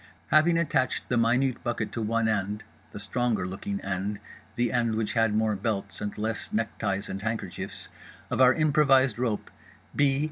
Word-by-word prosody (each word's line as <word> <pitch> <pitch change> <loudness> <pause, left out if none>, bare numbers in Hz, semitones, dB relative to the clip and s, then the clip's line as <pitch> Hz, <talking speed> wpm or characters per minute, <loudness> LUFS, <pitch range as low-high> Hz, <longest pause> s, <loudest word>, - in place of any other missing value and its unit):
Having 165 +2 +5
attached 140 -7 0
the 125 - +1
minute 125 +3 +2
bucket 120 -2 -2
to 115 - -3
one 115 +1 +1
end 105 0 -1 0.3
(the - - -8
stronger 110 -2 0
looking 100 +1 -4
end, 100 +2 -3 0.4
the 120 -1 +1
end 115 -3 +1
which 110 -1 -1
had 115 -2 +2
more 110 -1 +2
belts 100 0 -3
and 105 0 -4
less 110 +1 -3
neckties 105 -2 -1
and 95 - -5
handkerchiefs) 115 +1 -4 0.4
of - - +1
our 130 0 +7
improvised 135 -6 +4
rope, 115 -4 -1 0.4
B. 140 -1 +3
115 Hz, 165 wpm, -27 LUFS, 105-125 Hz, 0.4 s, our